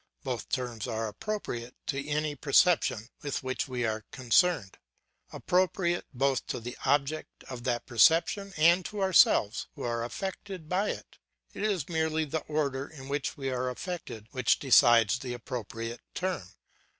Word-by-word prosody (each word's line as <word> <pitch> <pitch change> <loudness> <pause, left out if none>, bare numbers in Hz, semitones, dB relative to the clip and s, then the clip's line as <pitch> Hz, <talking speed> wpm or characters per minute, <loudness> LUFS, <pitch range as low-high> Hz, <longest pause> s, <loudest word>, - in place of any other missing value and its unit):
Both 125 -3 -4
terms 120 -5 -3
are 115 -1 -2
appropriate 120 - -5
to 140 0 -3
any 150 0 0
perception 145 -5 +3
with 145 -3 -3
which 130 0 -2
we 125 -2 -2
are 110 -1 -2
concerned, 135 - +2 0.5
appropriate 180 -1 +1
both 135 0 0
to - - -3
the 120 +2 -7
object 145 +3 0
of 125 -2 -8
that 120 -2 -1
perception 165 - +3
and 170 +4 +5
to 210 - -5
ourselves 170 - +4
who - - -7
are 115 -1 -1
affected 190 +4 -5
by 190 +5 +1
it; - - -7 0.3
it - - -7
is 200 -8 0
merely 160 -1 0
the 155 +2 -2
order 140 -3 -1
in 135 -4 -11
which 140 0 -2
we 135 -2 -2
are 125 0 -1
affected 125 - -6
which 130 - +2
decides 120 -4 +5
the 125 -2 -5
appropriate 115 -1 -6
term. 180 - -2
135 Hz, 150 wpm, -29 LUFS, 120-165 Hz, 0.5 s, and